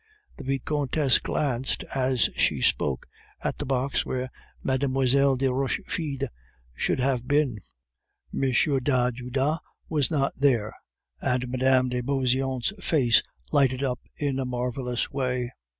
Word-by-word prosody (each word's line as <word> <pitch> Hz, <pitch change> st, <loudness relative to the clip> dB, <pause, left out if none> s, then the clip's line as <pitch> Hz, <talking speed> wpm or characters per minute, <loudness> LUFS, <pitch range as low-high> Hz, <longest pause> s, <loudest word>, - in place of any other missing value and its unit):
The -, -, -8 dB
Vicomtesse 135 Hz, +1 st, +2 dB
glanced 135 Hz, -3 st, -1 dB
as 130 Hz, -2 st, +2 dB
she -, -, +2 dB
spoke -, -, +1 dB, 0.4 s
at -, -, -2 dB
the -, -, -3 dB
box 135 Hz, 0 st, 0 dB
where 130 Hz, 0 st, -3 dB, 0.3 s
Mlle. 135 Hz, 0 st, +2 dB
de 130 Hz, 0 st, +1 dB
Rochefide 140 Hz, +1 st, -2 dB, 0.5 s
should -, -, 0 dB
have 125 Hz, -2 st, 0 dB
been; 145 Hz, -6 st, +2 dB, 0.7 s
M. -, -, -2 dB, 0.4 s
d'Ajuda 125 Hz, +3 st, 0 dB, 0.3 s
was 150 Hz, -4 st, +2 dB
not 140 Hz, -4 st, +1 dB
there, 125 Hz, -6 st, +2 dB, 0.5 s
and 125 Hz, -1 st, 0 dB
Mme. 130 Hz, 0 st, +3 dB
de 125 Hz, 0 st, -1 dB
Beauseant's 130 Hz, +2 st, 0 dB
face 125 Hz, -8 st, +4 dB, 0.3 s
lighted 130 Hz, -1 st, +3 dB
up 125 Hz, -2 st, -1 dB, 0.2 s
in 140 Hz, -2 st, -1 dB
a 130 Hz, -, -1 dB
marvelous 125 Hz, 0 st, -2 dB
way. 125 Hz, -2 st, -1 dB
130 Hz, 120 wpm, -26 LUFS, 125-140 Hz, 0.7 s, face